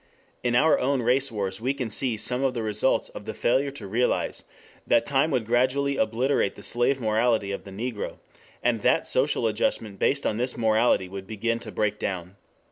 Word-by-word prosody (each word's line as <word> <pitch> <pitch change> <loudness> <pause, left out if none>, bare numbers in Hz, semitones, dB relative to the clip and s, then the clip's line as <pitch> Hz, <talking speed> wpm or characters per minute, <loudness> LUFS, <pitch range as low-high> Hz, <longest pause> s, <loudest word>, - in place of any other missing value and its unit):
In 120 -1 0
our 155 +6 +4
own 130 -1 +1
race 130 +3 +2
wars 100 -2 -3
we 130 +3 0
can 125 -5 -4
see 120 0 0
some 125 +5 0
of 130 -2 +1
the 115 - -2
results 105 +4 +1
of - - -10
the - - -5
failure 130 +4 +1
to 135 -7 -9
realize 115 +6 0 0.4
that 115 0 +3
time 140 +3 +2
would 125 -7 0
gradually 130 +4 +1
obliterate 115 0 +1
the - - -11
slave 120 +3 +2
morality 110 -2 +1
of 100 - -5
the 100 - -10
Negro, 110 +2 -4 0.5
and 120 -3 +1
that - - +2
social 130 -2 +1
adjustment 105 -2 -1
based 140 0 +1
on 105 - 0
this 125 +2 -1
morality 110 -3 +2
would 95 +1 -8
begin 115 +2 -2
to - - -8
break 105 0 -1
down. 90 0 -4
120 Hz, 195 wpm, -26 LUFS, 105-130 Hz, 0.5 s, our